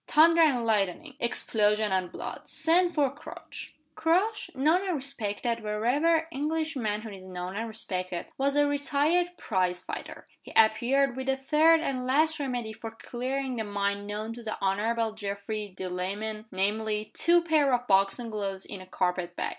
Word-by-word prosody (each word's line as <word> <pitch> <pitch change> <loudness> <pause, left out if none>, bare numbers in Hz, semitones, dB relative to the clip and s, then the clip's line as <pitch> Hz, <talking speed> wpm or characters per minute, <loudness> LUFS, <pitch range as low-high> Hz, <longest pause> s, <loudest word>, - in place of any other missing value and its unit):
"Thunder 330 +2 +6
and 265 -7 +3
lightning! 220 - 0
Explosion 215 -3 +1
and 185 -2 0
blood! - - -7
Send 345 +2 +2
for 285 -4 +2
Crouch." 290 +2 -10 0.2
Crouch 380 +7 +1
(known 310 +7 +3
and 370 -3 -1
respected 235 -4 -2
wherever 250 +10 +1
English 315 +2 -1
manhood 215 -3 -3
is 190 - -10
known 185 0 -6
and 225 +2 -2
respected) 185 -5 -3
was 275 +1 0
a 290 0 +5
retired 290 +4 +2
prize 185 -3 -1
fighter. - - -7 0.2
He - - -12
appeared 240 +4 +3
with 265 0 -5
the 270 0 +2
third 315 +4 +4
and 255 -5 -2
last 310 +4 +2
remedy 245 -5 -3
for 225 +1 -7
clearing 255 +3 -4
the 220 - -1
mind 200 0 -2
known 215 +2 -4
to 240 - -9
the 220 -2 -4
Honorable 220 +4 0
Geoffrey 205 0 -5
Delamayn 200 +4 -4
namely, 210 +2 -1
two 345 +1 +4
pair 310 -4 +3
of 245 0 +1
boxing 200 +3 +2
gloves 195 -2 -3
in 195 - -8
a 185 - -12
carpet 180 -1 -1
bag. - - -2
230 Hz, 160 wpm, -28 LUFS, 205-285 Hz, 0.2 s, Thunder